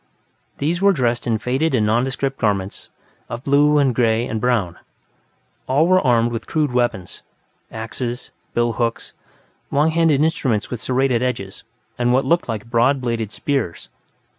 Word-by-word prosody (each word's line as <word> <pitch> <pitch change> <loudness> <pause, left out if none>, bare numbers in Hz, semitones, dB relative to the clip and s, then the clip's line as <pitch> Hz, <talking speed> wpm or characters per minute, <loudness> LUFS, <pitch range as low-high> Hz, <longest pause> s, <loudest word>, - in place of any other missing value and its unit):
These 165 +5 -1
were 200 0 +5
dressed 120 -5 0
in 115 -2 +1
faded 130 +7 0
and 110 -3 +2
nondescript 135 +4 0
garments 100 -3 -2 0.4
of 120 +1 -6
blue 145 +1 +4
and 135 -3 +3
gray 115 -1 +2
and 110 -3 -4
brown; 115 -9 0 0.9
all 140 +5 +3
were 185 0 +4
armed 120 -3 +2
with 115 -1 -5
crude 150 -4 0
weapons 120 -7 -1 0.5
axes, 120 +2 -5 0.2
bill 120 0 +2
hooks, 115 -1 -3 0.6
long 150 +3 +2
handled 160 -3 +3
instruments 135 -9 0
with 120 -3 -4
serrated 130 -2 +1
edges, 100 -7 -3 0.4
and 120 0 +2
what 130 +2 +2
looked 170 +1 +1
like 110 0 -4
broad 120 +4 +3
bladed 115 -4 -2
spears. 130 -9 -3
125 Hz, 150 wpm, -20 LUFS, 115-140 Hz, 0.9 s, were